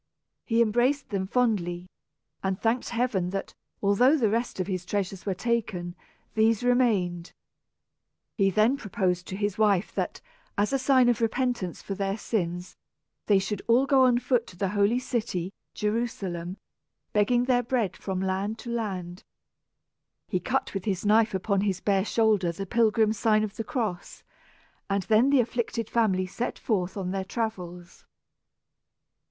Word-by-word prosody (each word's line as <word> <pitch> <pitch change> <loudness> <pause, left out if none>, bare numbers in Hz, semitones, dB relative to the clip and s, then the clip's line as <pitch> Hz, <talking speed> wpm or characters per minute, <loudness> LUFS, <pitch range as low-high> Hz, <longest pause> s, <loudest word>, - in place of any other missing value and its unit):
He 230 -1 +3
embraced 245 +6 +1
them 190 -2 -2
fondly, 190 -7 0 0.6
and 190 -1 -1
thanked 230 +2 0
heaven 230 -7 0
that, 195 +1 -4 0.3
though 200 - +2
all 250 +9 +5
the 225 -7 +2
rest 230 -2 -1
of 185 - 0
his 185 -2 -3
treasures 195 0 -3
were 195 - 0
taken, 195 -5 -2 0.4
these 220 +1 +2
remained. 205 -9 +1 1.0
He 195 -3 +3
then 215 +7 +3
proposed 185 -7 -1
to 190 - -5
his 205 0 -2
wife 205 -3 +2
that, - - -3 0.4
as 205 +6 +1
a 270 - +2
sign 260 -1 +4
of 240 -2 +2
repentance 230 -6 -1
for 195 - -4
their 195 +1 -2
sins, 180 -5 -3 0.5
they 205 - +5
should 195 +1 -2
all 245 +4 +4
go 270 -2 +5
on 245 -1 +4
foot 245 -1 +1
to 180 - -13
the 195 0 0
holy 205 +4 +2
city, 215 -7 -2 0.2
Jerusalem, 200 -5 -2 0.6
begging 240 +4 +3
their 250 -1 +3
bread 235 -5 -1
from 190 -2 -4
land 190 +3 -1
to 235 - -4
land. 190 -6 -4 1.0
He - - -1
cut - - -1
with 195 -2 -4
his 195 -2 -2
knife 215 0 +4
upon 195 +1 0
his 195 -3 0
bare 195 -1 +1
shoulder 215 -6 +2
the 195 +4 -5
pilgrim's 220 0 +2
sign 215 -1 +3
of 210 -1 -4
the 225 - -3
cross, 215 -7 -4 0.7
and 195 -1 0
then 220 +6 +4
the 280 -2 +5
afflicted 230 -1 -3
family 195 -5 +2
set 230 +6 -4
forth 190 -4 -1
on 185 -2 -3
their 195 0 -2
travels. 180 -5 -5
210 Hz, 160 wpm, -27 LUFS, 190-235 Hz, 1.0 s, all